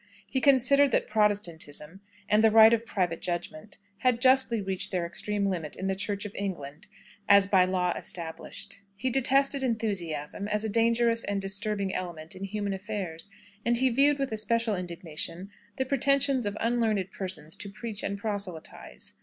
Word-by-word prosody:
He 260 Hz, -, 0 dB
considered 280 Hz, +1 st, +5 dB
that -, -, +2 dB
Protestantism, 190 Hz, -6 st, -1 dB, 0.3 s
and 210 Hz, +1 st, +3 dB
the 225 Hz, -, +7 dB
right 220 Hz, +1 st, +8 dB
of 230 Hz, 0 st, 0 dB
private 175 Hz, -5 st, -1 dB
judgment, 175 Hz, +1 st, -4 dB, 0.2 s
had 250 Hz, 0 st, +2 dB
justly 260 Hz, -2 st, +4 dB
reached 190 Hz, -2 st, 0 dB
their 180 Hz, -3 st, -1 dB
extreme 200 Hz, +4 st, -2 dB
limits 170 Hz, -6 st, -3 dB
in 190 Hz, -, -4 dB
the 190 Hz, -, +1 dB
Church 200 Hz, +1 st, -3 dB
of 205 Hz, -, -6 dB
England 175 Hz, -3 st, -5 dB, 0.4 s
as 200 Hz, -1 st, +7 dB
by 190 Hz, -2 st, +4 dB
law 180 Hz, -1 st, 0 dB
established. 180 Hz, +4 st, -6 dB
He 255 Hz, +6 st, -2 dB
detested 270 Hz, +2 st, +2 dB
enthusiasm 200 Hz, -, -2 dB
as 210 Hz, 0 st, 0 dB
a 220 Hz, -, -1 dB
dangerous 230 Hz, +1 st, +2 dB
and 200 Hz, -1 st, -2 dB
disturbing 195 Hz, 0 st, -2 dB
element 170 Hz, -2 st, -5 dB
in 190 Hz, +1 st, -5 dB
human 205 Hz, 0 st, -3 dB
affairs, 190 Hz, -3 st, -5 dB, 0.3 s
and 235 Hz, 0 st, +2 dB
he 260 Hz, +2 st, +3 dB
viewed 280 Hz, +4 st, +4 dB
with 275 Hz, -3 st, -2 dB
especial 220 Hz, 0 st, 0 dB
indignation 175 Hz, +1 st, -5 dB, 0.3 s
the 265 Hz, -, 0 dB
pretensions 275 Hz, -2 st, +2 dB
of 205 Hz, +1 st, -3 dB
unlearned 225 Hz, -5 st, 0 dB
persons 175 Hz, -5 st, -4 dB
to 200 Hz, -, -4 dB
preach 215 Hz, +1 st, -5 dB
and 200 Hz, -, -3 dB
proselytise. 200 Hz, -6 st, -6 dB
205 Hz, 160 wpm, -28 LUFS, 185-230 Hz, 0.4 s, right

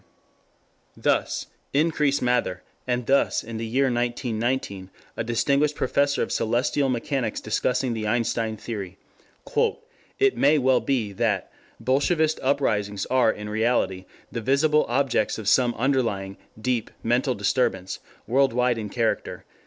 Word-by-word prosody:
] -, -, -38 dB
Thus -, -, 0 dB, 0.3 s
Increase 150 Hz, -2 st, +2 dB
Mather, 120 Hz, -7 st, 0 dB, 0.2 s
and 125 Hz, -1 st, -1 dB
thus 135 Hz, +3 st, +2 dB
in 115 Hz, 0 st, -6 dB
the 115 Hz, 0 st, -3 dB
year 130 Hz, +5 st, +1 dB
1919 120 Hz, -5 st, -1 dB, 0.3 s
a -, -, -2 dB
distinguished 140 Hz, +6 st, +1 dB
Professor 140 Hz, +2 st, +1 dB
of -, -, -5 dB
Celestial 125 Hz, +5 st, +1 dB
Mechanics 125 Hz, -1 st, -1 dB
discussing 125 Hz, +3 st, 0 dB
the 110 Hz, -1 st, -3 dB
Einstein 115 Hz, -1 st, 0 dB
theory: 100 Hz, -4 st, -6 dB, 1.2 s
"It 405 Hz, -1 st, +3 dB
may 145 Hz, +2 st, +4 dB
well 130 Hz, -2 st, +3 dB
be 115 Hz, -7 st, -1 dB
that.... 100 Hz, -2 st, -1 dB, 0.3 s
Bolshevist 155 Hz, +4 st, +1 dB
uprisings 105 Hz, -8 st, 0 dB
are 130 Hz, -3 st, +4 dB
in 105 Hz, -1 st, -7 dB
reality 105 Hz, -4 st, 0 dB, 0.3 s
the 115 Hz, -, -3 dB
visible 150 Hz, +5 st, +3 dB
objects 125 Hz, -4 st, +1 dB
of 110 Hz, -3 st, -6 dB
some 120 Hz, +2 st, +3 dB
underlying, 115 Hz, -7 st, 0 dB, 0.2 s
deep, 120 Hz, -1 st, -1 dB
mental 125 Hz, +3 st, +1 dB
disturbance, 95 Hz, -3 st, 0 dB, 0.3 s
world 135 Hz, +2 st, +2 dB
wide 125 Hz, -1 st, +1 dB
in 105 Hz, -1 st, -5 dB
character.... 115 Hz, +1 st, -2 dB
120 Hz, 130 wpm, -25 LUFS, 110-135 Hz, 1.2 s, may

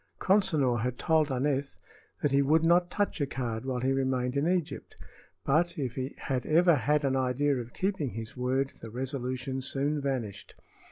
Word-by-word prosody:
Consinor 155 Hz, -, +2 dB
had 125 Hz, +2 st, -2 dB
told 155 Hz, -3 st, +2 dB
Aneth 135 Hz, +1 st, -1 dB, 0.5 s
that 145 Hz, -, +2 dB
he 140 Hz, 0 st, +4 dB
would 155 Hz, +4 st, +3 dB
not 175 Hz, +1 st, +4 dB
touch 205 Hz, -5 st, -1 dB
a 140 Hz, -, +1 dB
card 120 Hz, -3 st, -4 dB
while 130 Hz, -2 st, -2 dB
he 130 Hz, +1 st, +1 dB
remained 130 Hz, -1 st, 0 dB
in 140 Hz, +3 st, +1 dB
Egypt; 180 Hz, -3 st, -2 dB, 0.5 s
but 170 Hz, +5 st, +2 dB
if 130 Hz, -5 st, -2 dB
he 130 Hz, +2 st, -4 dB
had 130 Hz, -2 st, -2 dB
ever 170 Hz, +3 st, +5 dB
had 150 Hz, +1 st, +1 dB
an 135 Hz, -1 st, +1 dB
idea 130 Hz, +2 st, +1 dB
of 120 Hz, -1 st, -6 dB
keeping 190 Hz, -8 st, -1 dB
his 115 Hz, -1 st, -7 dB
word 130 Hz, +2 st, -1 dB
the 115 Hz, -, -8 dB
resolution 130 Hz, +1 st, -4 dB
soon 140 Hz, +3 st, +1 dB
vanished. 125 Hz, -8 st, -4 dB
135 Hz, 175 wpm, -29 LUFS, 125-150 Hz, 0.5 s, ever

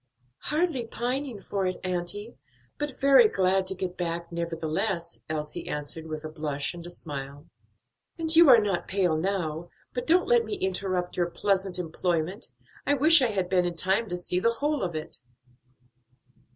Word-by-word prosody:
"Hardly 300 Hz, -6 st, 0 dB
pining 250 Hz, 0 st, -3 dB
for 195 Hz, -1 st, -2 dB
it, 185 Hz, -, -3 dB
auntie, 185 Hz, +5 st, -3 dB, 0.4 s
but 295 Hz, -3 st, -4 dB
very 270 Hz, -5 st, +7 dB
glad 190 Hz, -1 st, +2 dB
to 190 Hz, -, -1 dB
get 185 Hz, -1 st, -4 dB
back, 170 Hz, -1 st, -3 dB
nevertheless," 170 Hz, +2 st, -2 dB
Elsie 150 Hz, -1 st, -4 dB
answered, 150 Hz, +2 st, -4 dB
with 155 Hz, -1 st, -5 dB
a -, -, -4 dB
blush 150 Hz, -2 st, -3 dB
and 170 Hz, -1 st, -9 dB
a -, -, -7 dB
smile. 145 Hz, -3 st, -7 dB, 0.7 s
"And 325 Hz, -1 st, +2 dB
you 330 Hz, -2 st, +8 dB
are 245 Hz, -, +10 dB
not 205 Hz, -5 st, 0 dB
pale 185 Hz, -4 st, +1 dB
now. 170 Hz, -2 st, -2 dB, 0.2 s
But 245 Hz, -, -4 dB
don't 350 Hz, +3 st, +4 dB
let 240 Hz, -1 st, +4 dB
me 215 Hz, -1 st, -3 dB
interrupt 185 Hz, -1 st, -2 dB
your 175 Hz, -1 st, +1 dB
pleasant 195 Hz, 0 st, 0 dB
employment. 175 Hz, +3 st, -2 dB, 0.4 s
I 285 Hz, -, +2 dB
wish 310 Hz, +3 st, +7 dB
I 255 Hz, -, +4 dB
had 190 Hz, -4 st, -1 dB
been 180 Hz, -1 st, +2 dB
in 175 Hz, -, -4 dB
time 190 Hz, +7 st, +1 dB
to 180 Hz, -, -2 dB
see 180 Hz, 0 st, -1 dB
the 230 Hz, +5 st, +2 dB
whole 290 Hz, +4 st, -1 dB
of 175 Hz, -3 st, -2 dB
it." 155 Hz, -, -3 dB
185 Hz, 170 wpm, -27 LUFS, 170-230 Hz, 0.7 s, are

